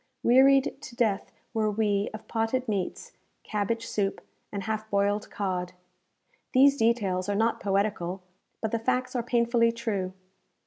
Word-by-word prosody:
Wearied 270 Hz, +2 st, +5 dB
to 240 Hz, -, -10 dB
death 220 Hz, -5 st, 0 dB, 0.2 s
were 220 Hz, -2 st, +1 dB
we 205 Hz, -1 st, +1 dB
of 215 Hz, 0 st, -9 dB
potted 230 Hz, +3 st, -1 dB
meats, 200 Hz, -4 st, -3 dB, 0.3 s
cabbage 220 Hz, +2 st, -2 dB
soup, 200 Hz, -3 st, -1 dB, 0.3 s
and 200 Hz, -1 st, -4 dB
half 220 Hz, 0 st, -3 dB
boiled 200 Hz, +1 st, +1 dB
cod. 180 Hz, -3 st, -3 dB, 0.8 s
These 275 Hz, +2 st, +6 dB
details 205 Hz, -6 st, +1 dB
are 205 Hz, -, +1 dB
not 225 Hz, +2 st, +1 dB
poetical, 195 Hz, -2 st, -1 dB, 0.4 s
but 220 Hz, -, 0 dB
the 230 Hz, -, 0 dB
facts 255 Hz, +2 st, -1 dB
are 245 Hz, -, +1 dB
painfully 235 Hz, -1 st, +2 dB
true. 210 Hz, -6 st, -3 dB
220 Hz, 140 wpm, -27 LUFS, 200-235 Hz, 0.8 s, These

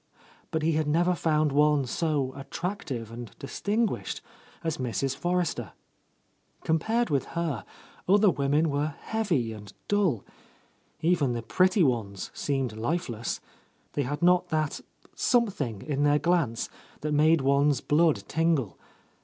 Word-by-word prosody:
But 160 Hz, -1 st, -1 dB
he 165 Hz, -, +3 dB
had 155 Hz, -1 st, 0 dB
never 175 Hz, +4 st, +3 dB
found 155 Hz, -2 st, +1 dB
one 150 Hz, -1 st, +3 dB
so 140 Hz, -1 st, -1 dB
attractive 140 Hz, -, -5 dB
and 120 Hz, -1 st, -7 dB
distinguished 210 Hz, +10 st, -1 dB, 0.4 s
as 160 Hz, -4 st, -2 dB
Mrs. 130 Hz, +2 st, -1 dB
Forrester, 175 Hz, -, -1 dB, 0.9 s
Compared 220 Hz, +7 st, +1 dB
with 140 Hz, -2 st, +1 dB
her, 155 Hz, -, -1 dB, 0.5 s
other 205 Hz, 0 st, +6 dB
women 145 Hz, +2 st, +1 dB
were 145 Hz, +1 st, -1 dB
heavy 170 Hz, -, 0 dB
and 105 Hz, -2 st, -10 dB, 0.2 s
dull; 190 Hz, -, +1 dB, 0.8 s
even 160 Hz, -6 st, +2 dB
the 115 Hz, -1 st, -3 dB
pretty 185 Hz, -, +3 dB
ones 110 Hz, -8 st, -1 dB
seemed 135 Hz, -6 st, -1 dB
lifeless, 120 Hz, -2 st, -2 dB, 0.2 s
— -, -, -39 dB
they 145 Hz, -, 0 dB
had 145 Hz, +5 st, -3 dB
not 180 Hz, 0 st, +4 dB
that 155 Hz, -2 st, -1 dB, 0.3 s
something 185 Hz, -, 0 dB
in 145 Hz, -2 st, -2 dB
their 145 Hz, 0 st, +4 dB
glance 150 Hz, -7 st, +1 dB, 0.3 s
that 150 Hz, -, -2 dB
made 155 Hz, +1 st, +4 dB
one's 140 Hz, 0 st, +3 dB
blood 150 Hz, -9 st, +2 dB
tingle. 160 Hz, -, 0 dB
150 Hz, 130 wpm, -28 LUFS, 130-170 Hz, 0.9 s, other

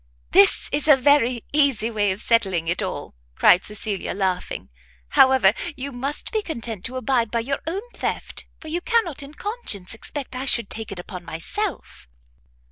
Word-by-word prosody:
"This 200 Hz, -, +5 dB
is 290 Hz, +1 st, -1 dB
a 295 Hz, -3 st, +8 dB
very 255 Hz, -3 st, +3 dB
easy 270 Hz, -7 st, +2 dB
way 205 Hz, -2 st, +1 dB
of 190 Hz, +3 st, -4 dB
settling 190 Hz, -8 st, +2 dB
it 170 Hz, +2 st, 0 dB
all," -, -, -4 dB, 0.2 s
cried 180 Hz, -, +5 dB
Cecilia 210 Hz, -2 st, -3 dB
laughing; 190 Hz, -2 st, -2 dB, 0.4 s
"however, 260 Hz, -7 st, +5 dB, 0.2 s
you 275 Hz, +2 st, -4 dB
must 275 Hz, +4 st, -3 dB
be 435 Hz, -, 0 dB
content 230 Hz, -, -3 dB
to 255 Hz, -, -3 dB
abide 255 Hz, -3 st, +1 dB
by 235 Hz, +1 st, 0 dB
your 275 Hz, +4 st, -2 dB
own 380 Hz, +5 st, -2 dB
theft, -, -, -4 dB
for 315 Hz, -, -11 dB
you 335 Hz, +3 st, -2 dB
cannot 445 Hz, -, +1 dB
in 285 Hz, +2 st, -10 dB
conscience 405 Hz, -, -4 dB
expect 260 Hz, +3 st, -6 dB
I 255 Hz, +1 st, -3 dB
should 235 Hz, -5 st, +3 dB
take 220 Hz, -2 st, -3 dB
it 195 Hz, -, -6 dB
upon 180 Hz, 0 st, -8 dB
myself." 170 Hz, -, -5 dB
245 Hz, 170 wpm, -23 LUFS, 200-290 Hz, 0.4 s, a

